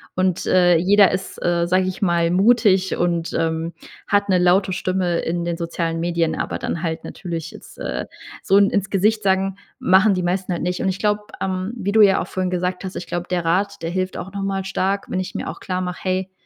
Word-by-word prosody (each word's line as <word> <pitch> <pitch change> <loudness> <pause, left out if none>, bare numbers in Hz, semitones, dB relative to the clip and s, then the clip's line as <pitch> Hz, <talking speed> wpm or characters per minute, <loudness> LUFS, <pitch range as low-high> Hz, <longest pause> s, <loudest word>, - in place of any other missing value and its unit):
Und, 185 -1 0
äh, 180 -1 +5
jeder 195 +4 +5
ist, 185 +1 -4
äh, 170 -1 +1
sage 185 +1 +2
ich 185 - -5
mal 170 -3 +2
mutig 195 -1 +3
und, 170 -1 0
ähm, 165 +1 -1 0.3
hat 205 0 +2
'ne 185 -2 +3
laute 185 +2 +3
Stimme 185 -2 0
in 170 +1 -2
den 170 - -1
sozialen 165 -1 -3
Medien. 170 -1 0
Aber - - -3
dann 165 - -3
halt 165 -2 -3
natürlich 170 -3 -6
jetzt, - - -14
äh, - - -4 0.4
so 195 - +3
in 200 0 +5
ins 200 -1 0
Gesicht 215 +3 +2
sagen, 190 -1 +1 0.2
machen 190 +2 +4
die 180 - -1
meisten 185 +1 -1
halt 175 - -2
nicht. 180 +1 -2
Und 190 - +1
ich 185 - -2
glaube, 210 0 +1 0.2
ähm, 185 +2 -2
wie 200 -2 -2
du 220 - +6
ja 200 -2 +6
auch - - -4
vorhin 185 -1 -2
gesagt 180 +1 -2
hast, 190 - -6
ich 175 - -5
glaube, 175 +1 -4
der 175 -2 -1
Rat, 185 +5 0
der 165 - -2
hilft 185 +1 -2
auch 190 - -6
noch 200 - -4
mal 195 -1 -2
stark, 195 +1 -1
wenn 185 - -1
ich 185 - -5
mir - - -4
auch - - -6
klar 185 -1 -2
mache: 180 -1 -4
„Hey, 185 0 -1
185 Hz, 230 wpm, -21 LUFS, 175-195 Hz, 0.4 s, du